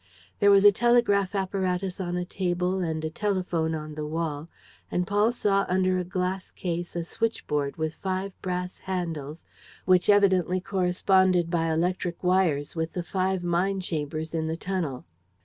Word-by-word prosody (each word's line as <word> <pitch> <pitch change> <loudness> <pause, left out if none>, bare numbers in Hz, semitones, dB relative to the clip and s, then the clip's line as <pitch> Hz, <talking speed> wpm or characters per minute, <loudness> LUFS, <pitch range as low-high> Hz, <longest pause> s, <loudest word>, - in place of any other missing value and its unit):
There 205 - +5
was 200 0 +6
a 205 - +10
telegraph 205 -4 +2
apparatus 190 -1 -1
on 175 -1 -2
a 180 - -2
table 180 0 -1
and 160 -3 -2
a - - -1
telephone 180 -5 -1
on 155 -1 -6
the 150 0 -5
wall; 155 -1 -3 0.4
and 180 - 0
Paul 205 +4 +2
saw 200 -4 +1
under 185 0 +2
a - - -1
glass 185 +1 -3
case 175 -1 -4
a 170 - -1
switch 225 +6 -2
board 145 -1 -1
with 160 0 -2
five 190 +1 -3
brass 180 0 -3
handles, 165 -5 -4 0.4
which 185 0 +4
evidently 190 -3 +4
corresponded 185 -1 +2
by 165 -2 +1
electric 175 +2 -1
wires 175 -6 +1
with 160 0 -2
the 180 - -3
five 185 0 -1
mine 180 +3 +1
chambers 155 -2 -3
in 160 -1 -1
the 160 +1 -2
tunnel. 170 -9 -3
180 Hz, 165 wpm, -26 LUFS, 165-190 Hz, 0.4 s, a